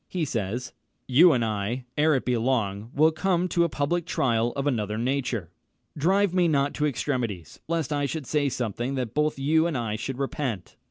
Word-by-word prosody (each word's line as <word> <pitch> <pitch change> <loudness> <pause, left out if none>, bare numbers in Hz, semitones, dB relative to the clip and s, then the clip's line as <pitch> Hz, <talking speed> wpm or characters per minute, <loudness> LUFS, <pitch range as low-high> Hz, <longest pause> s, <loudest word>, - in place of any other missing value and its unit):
He 175 -4 -2
says, 120 -1 -3 0.3
"You 160 +7 +7
and 120 -5 +2
I, 110 +4 -2
ere 155 0 +3
it 130 - -1
be 125 - +1
long, 115 -4 -1
will 155 +3 +5
come 180 +2 0
to 170 - +2
a 170 - +1
public 160 +4 -1
trial 120 -5 +1
of 140 - -3
another 105 -6 -1
nature." 120 - -2 0.4
"Drive 190 +5 +2
me 180 -2 +3
not 140 -2 +1
to 150 - 0
extremities, 120 - -3
lest 165 -2 -1
I 145 -1 0
should 155 -1 -4
say 145 +2 +1
something 120 +2 -3
that 125 -4 -3
both 150 0 +1
you 160 +4 +2
and 160 -6 -2
I 110 -3 -2
should 130 +3 -4
repent." 130 -7 -3
135 Hz, 195 wpm, -26 LUFS, 115-155 Hz, 0.4 s, You